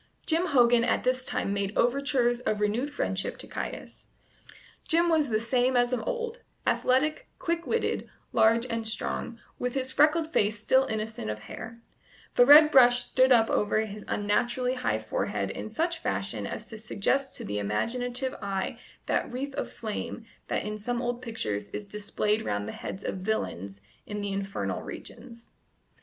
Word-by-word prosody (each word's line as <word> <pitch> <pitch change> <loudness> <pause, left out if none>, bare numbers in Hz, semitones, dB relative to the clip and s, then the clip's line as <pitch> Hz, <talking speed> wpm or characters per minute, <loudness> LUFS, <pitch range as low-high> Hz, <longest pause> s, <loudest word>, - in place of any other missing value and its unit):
Jim 335 +2 +2
Hogan 240 -5 +5
at 240 - +1
this 255 0 0
time 200 - -1
made 200 0 -2
overtures 245 -1 +2
of 215 -3 -1
renewed 215 +7 0
friendship 195 -9 -2
to - - -7
Caius. - - -6 0.8
Jim 340 +1 +4
was 310 -4 +3
the 215 -1 +2
same 250 +2 +2
as 245 +1 +3
of 250 - 0
old 475 0 -3 0.2
athletic, 305 - +1
quick 335 0 -2
witted, 460 - -1 0.2
large 230 +2 +4
and 230 -2 -2
strong, 230 +1 -2 0.2
with 250 +1 -2
his 260 -1 -1
freckled 310 +3 +3
face 210 +1 +2
still 260 +5 +3
innocent 220 - -4
of 105 0 -4
hair; 230 - -9 0.5
the 245 - +5
red 300 +2 +9
brush 245 -2 +6
stood 260 0 +3
up 225 -2 +6
over 210 +1 +2
his 210 -1 -6
unnaturally 240 +5 0
high 255 -1 0
forehead - - -2
in - - -6
such 335 +1 -1
fashion - - -2
as - - -6
to 220 - -8
suggest 245 +6 -1
to - - -5
the 105 0 -2
imaginative 245 - -1
eye 195 -1 -3 0.3
that - - 0
wreath 270 +3 -4
of - - -4
flame 225 +1 -5 0.2
that - - -1
in 210 0 -4
some 240 +3 -2
old 245 0 -2
pictures 105 - -3
is 210 - -6
displayed 210 +1 -1
round 105 - -2
the - - -4
heads 190 - -7
of - - -3
villains 100 - -3 0.3
in 210 0 -4
the 200 -1 -2
infernal 195 0 -3
regions. 235 -1 -10
240 Hz, 170 wpm, -28 LUFS, 210-265 Hz, 0.8 s, red